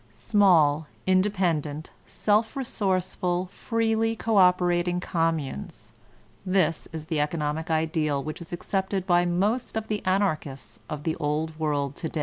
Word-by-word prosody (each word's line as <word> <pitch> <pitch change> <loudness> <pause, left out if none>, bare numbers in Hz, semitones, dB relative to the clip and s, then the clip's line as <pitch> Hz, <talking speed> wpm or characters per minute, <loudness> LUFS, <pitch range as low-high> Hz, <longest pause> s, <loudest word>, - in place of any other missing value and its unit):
Small, 155 - +3 0.2
independent, 180 -6 0 0.2
self 215 +1 +1
resourceful, 185 -7 -1
freely 225 0 0
cooperating 180 -4 +3
communes 165 - -2 0.3
— 115 - -14
^this 165 -3 +1
is 160 -1 -6
the 160 -2 -1
economic 150 +1 -1
ideal 155 -3 0
which 155 +3 -6
is 170 - -9
accepted 190 +2 -2
by 175 -1 +3
most 205 +8 0
of 220 - -4
the 210 -1 -2
Anarchists 185 -8 -1
of 150 -2 -5
the 160 - -1
Old 155 +1 -2
World 145 -3 -1
to 160 - -3
day. 160 - -4
175 Hz, 135 wpm, -26 LUFS, 155-195 Hz, 0.3 s, Small